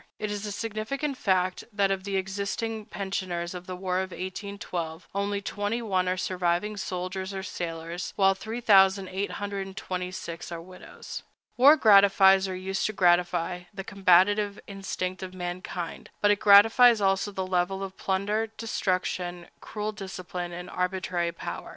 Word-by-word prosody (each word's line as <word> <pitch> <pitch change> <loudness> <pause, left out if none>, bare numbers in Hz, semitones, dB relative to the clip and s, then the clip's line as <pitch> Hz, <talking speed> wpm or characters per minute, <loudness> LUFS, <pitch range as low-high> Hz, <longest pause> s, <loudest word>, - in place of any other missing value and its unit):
It 210 -1 -3
is 205 0 -4
a - - -4
significant 225 +7 -3
fact 185 -5 0
that 200 -2 +1
of 190 0 -2
the 200 -1 -2
existing 200 +3 -3
pensioners 185 -4 -3
of 180 0 -8
the 185 - -5
war 185 0 -1
of 190 0 -2
1812 185 -3 -5
only 200 +1 -1
twenty 205 +4 -2
one 185 -4 +1
are 185 - 0
surviving 180 +3 0
soldiers 190 0 -4
or 190 - -4
sailors, 170 -1 -5
while 195 -1 +4
3826 190 -4 0
are 170 - -4
widows. 185 +2 -9 0.3
War 285 +5 +7
gratifies, 195 -4 +6
or 185 - -4
used 190 +1 -2
to 215 - -4
gratify, 175 -1 +2
the 195 -1 -6
combative 200 +2 +3
instinct 185 -2 -4
of 185 0 -7
mankind, 175 -1 -5
but 205 - +4
it 205 - +2
gratifies 225 +3 +7
also 195 +1 +1
the 190 -1 -3
love 180 -1 +1
of 195 0 -5
plunder, 205 +3 -1
destruction, 180 -5 -2
cruel 210 0 -4
discipline, 185 -3 -6
and 175 +1 -7
arbitrary 180 -2 -1
power. 170 - -7
190 Hz, 145 wpm, -27 LUFS, 180-205 Hz, 0.3 s, War